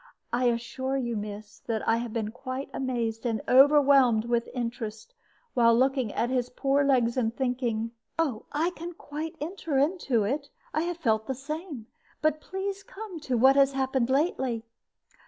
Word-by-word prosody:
I 250 Hz, +1 st, +2 dB
assure 245 Hz, +3 st, -1 dB
you, 240 Hz, -3 st, -2 dB
miss, 210 Hz, 0 st, -6 dB
that 220 Hz, -2 st, -2 dB
I 225 Hz, -, +4 dB
have 235 Hz, -1 st, -4 dB
been 215 Hz, -1 st, -2 dB
quite 260 Hz, +3 st, -6 dB
amazed 235 Hz, -4 st, -2 dB
and 225 Hz, -3 st, 0 dB
overwhelmed 270 Hz, -4 st, +6 dB
with 235 Hz, 0 st, 0 dB
interest 235 Hz, -, -5 dB, 0.4 s
while 230 Hz, -2 st, +5 dB
looking 260 Hz, -3 st, +2 dB
at 240 Hz, +2 st, 0 dB
his 250 Hz, -1 st, 0 dB
poor 275 Hz, +2 st, +1 dB
legs, 255 Hz, -3 st, +2 dB
and 225 Hz, -3 st, +1 dB
thinking 240 Hz, -3 st, -1 dB
" -, -, -50 dB, 0.3 s
"I 320 Hz, +4 st, +1 dB
can 345 Hz, +2 st, -6 dB
quite 310 Hz, +1 st, -6 dB
enter 320 Hz, -2 st, -3 dB
into 280 Hz, -, +2 dB
it. 280 Hz, +7 st, -2 dB, 0.2 s
I 310 Hz, -, +1 dB
have 350 Hz, -1 st, -3 dB
felt 220 Hz, -8 st, +1 dB
the 265 Hz, -, -2 dB
same. 295 Hz, -, -6 dB, 0.3 s
But 310 Hz, 0 st, +1 dB
please 385 Hz, +3 st, -4 dB
to 395 Hz, -, -18 dB
come 400 Hz, -5 st, -8 dB
to 260 Hz, -5 st, -1 dB
what 265 Hz, +3 st, +6 dB
has 275 Hz, 0 st, +5 dB
happened 265 Hz, -2 st, 0 dB
lately." 265 Hz, -5 st, +1 dB
260 Hz, 170 wpm, -28 LUFS, 230-290 Hz, 0.4 s, overwhelmed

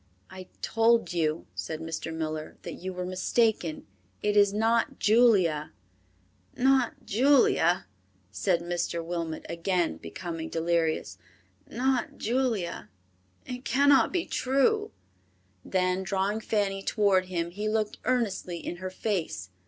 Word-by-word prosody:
"I 185 Hz, -1 st, -9 dB, 0.2 s
told 230 Hz, -3 st, +2 dB
you," 160 Hz, -2 st, 0 dB
said 160 Hz, -1 st, -5 dB
Mr. 160 Hz, 0 st, -5 dB
Miller, 155 Hz, -1 st, -4 dB
"that -, -, -6 dB
you 190 Hz, +1 st, -6 dB
were 180 Hz, 0 st, -4 dB
mistaken; 185 Hz, -2 st, 0 dB, 0.4 s
it 210 Hz, 0 st, +1 dB
is 205 Hz, -1 st, +5 dB
not 225 Hz, +2 st, +1 dB
Julia." 200 Hz, -, +3 dB, 0.8 s
"Not 265 Hz, -2 st, +2 dB
Julia!" 220 Hz, -, +3 dB, 0.5 s
said 170 Hz, -, +1 dB
Mr. 170 Hz, -1 st, -2 dB
Wilmot, 165 Hz, -2 st, -4 dB
again 170 Hz, -, -1 dB
becoming 165 Hz, -, -6 dB
delirious. 165 Hz, -, -1 dB, 0.5 s
"Not 255 Hz, +1 st, -1 dB
Julia! 230 Hz, -7 st, -1 dB, 0.6 s
It 250 Hz, 0 st, -6 dB
cannot 280 Hz, +1 st, +4 dB
be 355 Hz, -2 st, -1 dB
true." 265 Hz, +1 st, +1 dB, 0.7 s
Then 185 Hz, 0 st, 0 dB
drawing 195 Hz, +2 st, -1 dB
Fanny 200 Hz, -3 st, -1 dB
toward 195 Hz, -3 st, +2 dB
him 170 Hz, -2 st, -3 dB
he 210 Hz, +4 st, -3 dB
looked 215 Hz, -1 st, -1 dB
earnestly 215 Hz, -8 st, -1 dB
in 175 Hz, -, -6 dB
her 185 Hz, +1 st, -5 dB
face. 185 Hz, -, -3 dB
185 Hz, 120 wpm, -28 LUFS, 170-225 Hz, 0.8 s, is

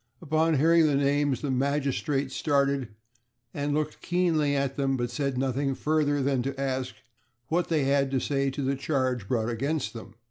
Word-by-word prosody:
Upon 160 Hz, 0 st, +1 dB
hearing 165 Hz, +2 st, +5 dB
the 145 Hz, -, +2 dB
names 140 Hz, -1 st, +1 dB
the 145 Hz, -, -2 dB
magistrate 140 Hz, +1 st, 0 dB
started, 140 Hz, -2 st, +1 dB, 0.7 s
and 145 Hz, 0 st, -1 dB
looked 155 Hz, 0 st, -2 dB
keenly 165 Hz, -5 st, +1 dB
at 140 Hz, -1 st, -1 dB
them, 135 Hz, -1 st, 0 dB
but 120 Hz, -1 st, -2 dB
said 140 Hz, -1 st, -2 dB
nothing 135 Hz, +1 st, 0 dB
further 145 Hz, -2 st, +1 dB
than 135 Hz, -2 st, +1 dB
to 135 Hz, +1 st, -4 dB
ask 130 Hz, -2 st, -2 dB, 0.5 s
what 170 Hz, +2 st, +1 dB
they 155 Hz, -4 st, +1 dB
had 140 Hz, 0 st, +2 dB
to 135 Hz, -1 st, 0 dB
say 140 Hz, +1 st, 0 dB
to 135 Hz, +1 st, -4 dB
the 135 Hz, +1 st, 0 dB
charge 130 Hz, -6 st, -1 dB
brought 115 Hz, 0 st, 0 dB
against 140 Hz, +5 st, -2 dB
them. 115 Hz, -1 st, -10 dB
140 Hz, 175 wpm, -27 LUFS, 130-150 Hz, 0.7 s, hearing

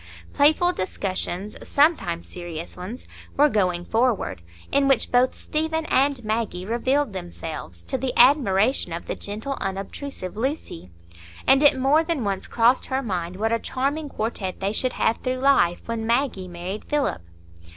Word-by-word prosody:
Playful 315 Hz, +5 st, +4 dB
discussions—sometimes 190 Hz, -, -1 dB
serious 170 Hz, -2 st, -7 dB
ones—were 245 Hz, +8 st, -2 dB
going 180 Hz, -6 st, 0 dB
forward, 225 Hz, -, 0 dB, 0.3 s
in 280 Hz, 0 st, +3 dB
which 270 Hz, -4 st, +2 dB
both 250 Hz, +1 st, +3 dB
Stephen 320 Hz, +1 st, -2 dB
and 275 Hz, -5 st, +1 dB
Maggie 215 Hz, -4 st, -2 dB
revealed 255 Hz, +3 st, 0 dB
themselves, 160 Hz, -, -7 dB
to 85 Hz, -, -3 dB
the 265 Hz, -1 st, -1 dB
admiration 240 Hz, -, +4 dB
of 170 Hz, -, -5 dB
the -, -, -3 dB
gentle, 220 Hz, +7 st, -5 dB
unobtrusive 195 Hz, +2 st, -5 dB
Lucy; 225 Hz, -, -4 dB, 0.6 s
and 270 Hz, +1 st, +5 dB
it 290 Hz, -2 st, +6 dB
more 275 Hz, +5 st, +3 dB
than 325 Hz, -6 st, -2 dB
once 195 Hz, -2 st, -2 dB
crossed 240 Hz, +2 st, +3 dB
her 265 Hz, 0 st, -1 dB
mind 180 Hz, -5 st, -3 dB
what 220 Hz, +3 st, -1 dB
a 230 Hz, -, +2 dB
charming 285 Hz, +5 st, -2 dB
quartet 215 Hz, -6 st, -3 dB
they 195 Hz, +2 st, -1 dB
should 255 Hz, +3 st, 0 dB
have 225 Hz, -, +1 dB
through 255 Hz, 0 st, -2 dB
life 255 Hz, -10 st, +3 dB
when 230 Hz, -1 st, -3 dB
Maggie 235 Hz, -6 st, 0 dB
married 180 Hz, +4 st, -6 dB
Philip. 295 Hz, -, 0 dB
230 Hz, 145 wpm, -24 LUFS, 185-275 Hz, 0.6 s, it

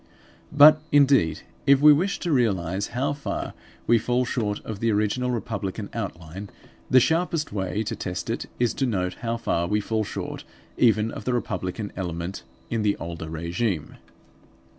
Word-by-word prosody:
But, 150 Hz, +1 st, +8 dB
indeed, 135 Hz, -, +4 dB, 0.3 s
if 140 Hz, -1 st, +6 dB
we 150 Hz, +1 st, +8 dB
wish 185 Hz, +7 st, 0 dB
to 175 Hz, -, -1 dB
realise 100 Hz, -, +1 dB
how 135 Hz, +4 st, -1 dB
far 140 Hz, -1 st, -4 dB, 0.3 s
we 115 Hz, 0 st, +4 dB
fall 125 Hz, +3 st, 0 dB
short 105 Hz, -5 st, -1 dB
of 110 Hz, -3 st, -5 dB
the 115 Hz, +1 st, +1 dB
original 105 Hz, +4 st, 0 dB
republican 105 Hz, -5 st, -3 dB
outline, 85 Hz, +5 st, -6 dB, 0.4 s
the 130 Hz, -, +7 dB
sharpest 165 Hz, +2 st, +1 dB
way 100 Hz, +2 st, -1 dB
to -, -, -3 dB
test 90 Hz, 0 st, -4 dB
it -, -, -3 dB
is 120 Hz, -1 st, +2 dB
to 135 Hz, -, 0 dB
note 90 Hz, -5 st, -1 dB
how 115 Hz, 0 st, -1 dB
far 85 Hz, -6 st, -1 dB
we 105 Hz, +3 st, +1 dB
fall 110 Hz, +1 st, -1 dB
short -, -, -5 dB, 0.3 s
even 110 Hz, -2 st, +3 dB
of -, -, -8 dB
the 125 Hz, -, 0 dB
republican 100 Hz, -3 st, -3 dB
element 85 Hz, 0 st, -4 dB, 0.3 s
in 115 Hz, -2 st, 0 dB
the 105 Hz, -1 st, +1 dB
older 85 Hz, -1 st, -6 dB
regime. 85 Hz, +2 st, -2 dB
110 Hz, 160 wpm, -25 LUFS, 95-125 Hz, 0.4 s, But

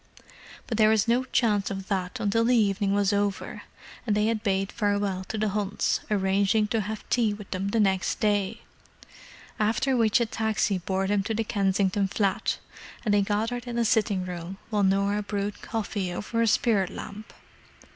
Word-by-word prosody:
But 225 Hz, -2 st, -3 dB
there 215 Hz, 0 st, +6 dB
was 220 Hz, -1 st, +3 dB
no 245 Hz, +3 st, +2 dB
chance 215 Hz, -6 st, +1 dB
of 195 Hz, -1 st, -5 dB
that 185 Hz, -3 st, -2 dB
until 210 Hz, +3 st, +1 dB
the 245 Hz, +1 st, +4 dB
evening 200 Hz, -2 st, +2 dB
was 205 Hz, 0 st, +2 dB
over, 200 Hz, -1 st, -2 dB, 0.5 s
and 210 Hz, -, +2 dB
they 210 Hz, -, +2 dB
had 225 Hz, -1 st, 0 dB
bade 195 Hz, -2 st, 0 dB
farewell 205 Hz, -3 st, -1 dB
to 220 Hz, -, -5 dB
the 215 Hz, 0 st, 0 dB
Hunts, 205 Hz, 0 st, 0 dB
arranging 200 Hz, +1 st, +2 dB
to 225 Hz, 0 st, +1 dB
have 215 Hz, +2 st, -6 dB
tea 225 Hz, -4 st, +2 dB
with 205 Hz, -2 st, -11 dB
them 190 Hz, +1 st, -2 dB
next 200 Hz, -3 st, +1 dB
day: 205 Hz, 0 st, 0 dB, 1.0 s
after 235 Hz, +5 st, +1 dB
which 225 Hz, -2 st, +3 dB
a 235 Hz, -, +2 dB
taxi 220 Hz, -3 st, 0 dB
bore 190 Hz, +2 st, -1 dB
them 200 Hz, +1 st, +1 dB
to 220 Hz, +3 st, -3 dB
the 225 Hz, -, 0 dB
Kensington 195 Hz, -1 st, +1 dB
flat, 195 Hz, 0 st, 0 dB, 0.5 s
and 210 Hz, -, +2 dB
they 205 Hz, -, +4 dB
gathered 225 Hz, +5 st, -1 dB
in 240 Hz, -, -4 dB
the 235 Hz, -1 st, +1 dB
sitting 210 Hz, -5 st, +1 dB
room 180 Hz, +1 st, -6 dB
while 210 Hz, -1 st, +1 dB
Norah 200 Hz, +1 st, +2 dB
brewed 205 Hz, 0 st, -3 dB
coffee 205 Hz, -4 st, -3 dB
over 230 Hz, +5 st, -2 dB
a 230 Hz, -, +3 dB
spirit 215 Hz, -4 st, +2 dB
lamp. 215 Hz, +1 st, -8 dB
205 Hz, 175 wpm, -26 LUFS, 195-220 Hz, 1.0 s, there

